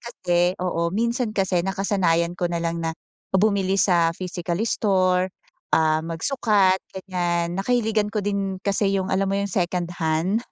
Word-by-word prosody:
kasi, 180 -6 0
oo 170 -1 0
minsan 235 +1 0
kasi 190 -3 +1
nakasanayan 180 -3 +1
ko 175 0 -2
na 170 - -2
lang 170 0 -2
na 165 0 -3 0.4
bumili 195 -1 +2
sa 175 -3 +3
physical 175 -2 -4
store, 185 -4 +2 0.5
ah, 155 -1 +2
magsukat 190 - +1
ganyan, 175 -2 -2
nakahiligan 220 -2 +1
ko 210 -1 -3
din 200 -2 -1
kasi 200 0 +1
yung 190 0 -2
alam 195 +1 +1
mo 195 - 0
yung 200 0 -1
second 175 -1 -1
hand 165 +7 +1
185 Hz, 150 wpm, -23 LUFS, 170-200 Hz, 0.5 s, sa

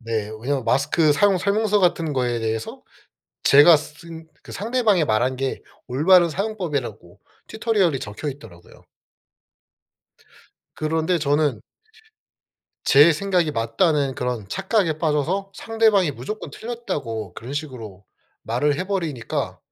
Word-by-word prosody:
네. 110 -3 -3
왜냐하면 135 0 -2
마스크 150 +4 +2
사용 195 +6 +3
설명서 205 +2 +1
같은 165 -4 +1
거에 125 -3 -1
대해서 110 0 -4 0.6
제가 145 +4 +8
쓴 160 +2 -10 0.2
상대방이 215 -4 +1
말한 125 +1 0
게 135 0 -3 0.2
올바른 170 +7 +4
사용법이라고 150 - -4 0.3
튜토리얼이 210 - +1
적혀 110 +8 -6
있더라고요. 95 -11 -12 1.9
그런데 160 +3 0
저는 145 -4 +1 1.2
제 150 +4 +6
생각이 180 -1 0
맞다는 135 +4 0
그런 125 -6 -3
착각에 165 - 0
빠져서 165 +6 -1
상대방이 220 -6 +2
무조건 135 - -7
틀렸다고 135 - -5
그런 120 +9 -8
식으로 115 -10 -7 0.4
말을 145 +6 0
해버리니까 170 - -3
150 Hz, 285 characters per minute, -22 LUFS, 125-185 Hz, 1.9 s, 제가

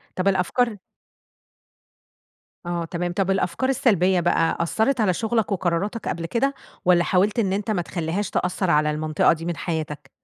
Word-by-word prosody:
طب 185 +1 -1
الأفكار 205 +4 +1 1.9
آه 175 -1 -2
تمام، 175 +1 -3
طب 195 +1 0
الأفكار 195 +6 0
السلبية 190 -8 +3
بقى 170 -1 +1
أثّرت 220 +9 +1
على 195 -4 +3
شغلك 220 +1 -1
وقراراتك 190 +4 -1
قبل 165 -1 -3
كده، 265 +10 0 0.3
والّا 175 -1 +5
حاولت 200 +6 +2
إن 195 -4 +1
أنت 205 +2 -2
ما 190 -5 0
تخليهاش 175 +3 -3
تأثر 180 0 -1
على 150 -1 +3
المنطقة 155 0 +2
دي 165 0 -7
من 170 -2 -3
حياتك؟ 150 -3 -4
180 Hz, 150 wpm, -23 LUFS, 170-210 Hz, 1.9 s, والّا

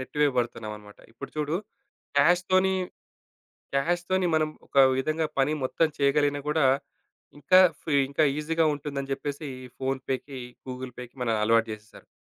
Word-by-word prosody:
నెట్టి 130 +3 -7
వేయబడుతున్నామనమాట. 110 -6 -2
ఇప్పుడు - - -9
చూడు 150 +2 0 0.6
క్యాష్‌తోని 185 +4 +3 1.0
క్యాష్‌తోని 175 +5 +1
మనం 155 -1 +2 0.2
ఒక - - -6 0.2
విధంగా 155 +4 0
పని 135 +2 +3
మొత్తం 160 +5 +2
చేయగలిగినా 145 0 +2
గూడా, 150 -1 +2 0.7
ఇంకా 185 +6 +6 0.2
ఫీ 155 - -3 0.2
ఇంకా 140 +2 +2
ఈజీ‌గా 160 +2 +1
ఉంటుందని 140 -1 -5
జెప్పేసి, 140 +2 -4 0.2
ఈ - - -9
ఫోన్‌పేకి, 135 0 -3 0.3
గూగుల్‌పేకి 125 -1 -8
మన 125 - 0
అలవాటు 115 +1 +3
జేసేశారు. 105 0 -11
140 Hz, 125 wpm, -27 LUFS, 130-155 Hz, 1.0 s, ఇంకా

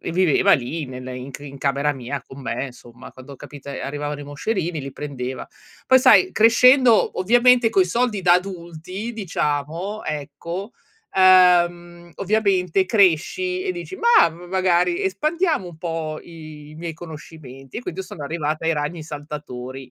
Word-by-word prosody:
e - - -5
viveva 185 +2 +3
lì, 150 +3 0
nella 130 0 -8
in 125 +2 -7
c - - -8
in 140 -1 -10
camera 140 +1 0
mia, 135 +1 -6
con 135 +1 -12
me, 135 +1 -3
insomma, 120 -1 -14
quando 130 +2 -12
ho - - -11
capito 140 +1 -11
ehm, - - -6
arrivavano 145 +1 -4
i - - -8
moscerini 165 +3 -3
li 135 -1 -7
prendeva. 130 -3 -6 0.4
Poi 260 0 +6
sai, 370 +8 +5
crescendo, 235 +1 +5
ovviamente 240 +3 +4
coi 190 -2 +3
soldi 230 +1 0
da 175 0 +5
adulti, 185 +3 -5
diciamo, 170 +1 -3
ecco, 155 - -6 0.4
ehm, 175 -2 +4
ovviamente 195 -3 +1
cresci, 225 - +2
e 375 - -2
dici: 365 +1 -7
"Mah, 470 - +5
m 170 +2 -13
magari 180 -2 +1
espandiamo 305 - 0
un 160 - -13
po' 160 -2 -4
i 155 -2 -12
miei 170 0 -5
conoscimenti" 150 - -10
e - - -6
quindi 180 -3 -5
io 190 - -7
sono 150 - -8
arrivata 155 +1 -3
ai 165 - +3
ragni 150 +3 -3
saltatori. 135 -4 -8
170 Hz, 160 wpm, -21 LUFS, 145-195 Hz, 0.4 s, Poi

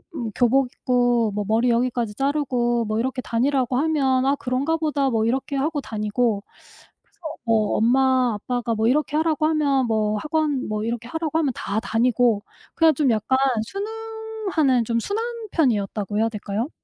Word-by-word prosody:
음 235 -7 -4
교복 255 +2 +3
입고 245 -3 +1
뭐 205 +1 -2
머리 230 +3 +2
여기까지 235 -2 0
자르고 250 -4 0
뭐 215 +1 -2
이렇게 260 +1 -2
다니라고 255 +1 0
하면 270 -3 +1
아 275 +1 +3
그런가 275 +5 -1
보다 290 -4 0
뭐 225 -2 +1
이렇게 265 +4 -1
하고 295 +2 -1
다니고 215 -1 -1 0.6
그래서 - - -37 0.3
뭐 220 -2 +2
엄마, 255 +1 +3
아빠가 240 +2 -2
뭐 220 +1 +1
이렇게 295 +3 +1
하라고 310 -1 +1
하면 285 -5 +2
뭐 215 -1 0
학원 300 0 -1
뭐 215 0 -2
이렇게 235 0 -4
하라고 320 0 -2
하면 295 -4 +1
다 205 +2 -2
다니고 230 -1 +2 0.3
그냥 325 -1 +5
좀 270 -3 +2
약간 225 +4 +1 0.3
순응하는 430 - -2
"좀 230 0 -1
순한 425 - -2 0.3
편이었다."고 210 - 0
해야 225 +1 +2
될까요? 215 +3 -4
250 Hz, 340 characters per minute, -23 LUFS, 225-290 Hz, 0.6 s, 그냥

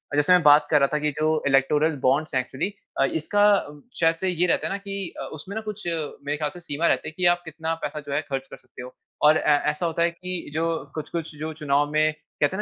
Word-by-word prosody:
जैसे 145 +5 +4
मैं 180 - +6
बात 145 0 +6
कर 150 - +6
रहा 140 - +4
था - - +3
कि 150 0 0
जो 155 +1 0
इलेक्टोरल 145 +3 +3
बॉन्ड्स 140 +4 +1
हैं 130 - +3
एक्चुअली 135 +10 -4 0.3
अ, - - +5
इसका 165 +8 +1 0.6
शायद 165 0 +3
से 190 - +1
ये 180 0 +1
रहता - - +1
हैं - - -3
ना - - -2
कि 195 -2 -5
अ, - - -4
उसमें 185 +7 -8
न 220 - -2
कुछ 210 -3 -6
मेरे 150 -3 -3
ख़्याल 150 -1 -1
से 175 - -10
सीमा 165 0 -1
रहती - - +1
है - - -14
की 180 - 0
आप 175 - -17
कितना 160 +1 -3
पैसा 150 - -4
जो 140 - -3
है 145 - +1
ख़र्च 135 -1 -3
कर - - -9
सकते 125 -1 -13
हो 125 +1 -9 0.3
और 150 +1 +7
अ, 150 - 0 0.2
ऐसा 150 +3 -4
होता 165 0 -1
है 170 - +2
कि 180 -1 -6
जो 165 +1 0
अ, - - -8
कुछ-कुछ 160 0 -5
जो 155 +1 -4
चुनाव 145 -1 +1
में 155 0 +2 0.3
कहते 150 +6 +2
हैं - - -4
155 Hz, 260 wpm, -24 LUFS, 145-170 Hz, 0.6 s, और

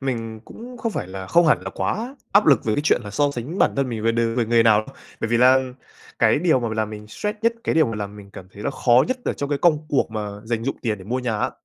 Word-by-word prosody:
mình 115 -4 -4
cũng 245 - -11
không 230 -2 -2
phải - - -3
là 95 0 -7
không 170 - +4
hẳn 155 - +4
là - - -6
quá 245 +6 -3 0.2
áp 200 +2 +5
lực 140 -7 +4
về 110 -1 +1
cái 145 - -1
chuyện 150 - +2
là 100 - -7
so 145 +6 +1
sánh 140 +8 -6
bản - - +4
thân 135 -1 0
mình 115 -3 -4
về 115 +1 +2
đ 115 - -2 0.2
về 120 - +2
người 115 0 +4
nào. 110 -1 +4 0.3
Bởi 115 - -1
vì 120 - +2
là 130 +2 +6 0.6
cái - - +4
điều 160 -5 +2
mà 115 - -2
làm 110 -1 -1
mình 105 0 -9
stress 210 - -4
nhất, 230 - +3
cái - - 0
điều 160 -4 +4
mà 115 - -4
làm 105 0 -6
mình 100 -1 -13
cảm 95 -1 -11
thấy 105 - -10
là - - -1
khó 125 -2 +3
nhất 255 - 0
ở - - 0
trong 140 - -4
cái 145 - -1
công 155 -2 +2
cuộc 140 -5 +1
mà 105 -2 -4 0.2
dành 115 0 -2
dụm 135 - -2
tiền 110 -4 -1
để 95 - -12
mua 125 +5 -2
nhà 120 -4 -2
á - - 0
120 Hz, 300 wpm, -22 LUFS, 110-150 Hz, 0.6 s, là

